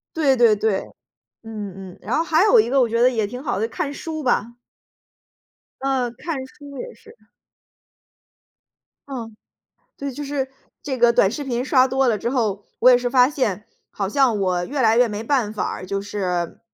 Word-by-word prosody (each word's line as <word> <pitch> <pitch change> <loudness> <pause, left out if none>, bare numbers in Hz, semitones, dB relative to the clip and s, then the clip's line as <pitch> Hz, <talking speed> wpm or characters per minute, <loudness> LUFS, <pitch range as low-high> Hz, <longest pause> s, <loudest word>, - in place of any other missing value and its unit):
对 285 -5 +3
对 235 -3 +5
对， 205 -2 0 0.6
嗯 200 -4 -7
嗯， - - -17
然 225 - -2
后 325 - +1
还 330 +3 +3
有 460 +3 +6
一 430 - +3
个 275 0 +3
我 245 - +3
觉 230 +1 0
得 250 - +6
也 220 -4 0
挺 250 +4 -7
好 245 -9 -2
的， 225 +2 -1
看 285 +3 -3
书 315 +1 -5
吧。 235 -2 0 1.3
嗯， 260 -3 -1
看 330 -4 -4
书 285 0 -13
也 485 0 -7
是。 450 +1 -18 1.9
嗯， 230 -5 -7 0.6
对， 280 -1 -4
就 290 +3 -6
是 275 -2 -3 0.3
这 265 -3 -4
个 240 0 +5
短 195 -4 +4
视 285 +6 -5
频 245 -2 -2
刷 260 -1 +4
多 265 0 +1
了 225 -3 +2
之 235 +4 -2
后， 215 -6 -1 0.2
我 255 - +7
也 250 - +7
是 245 0 -2
发 250 +1 +5
现 215 -8 -2 0.3
好 195 - -3
像 250 0 +2
我 180 -2 0
越 280 0 -2
来 225 -1 +4
越 245 - +5
没 210 0 -5
办 230 -4 +1
法 215 - -2
儿， - - -6
就 195 +1 -3
是 185 -4 -3
245 Hz, 205 characters per minute, -22 LUFS, 210-275 Hz, 1.9 s, 我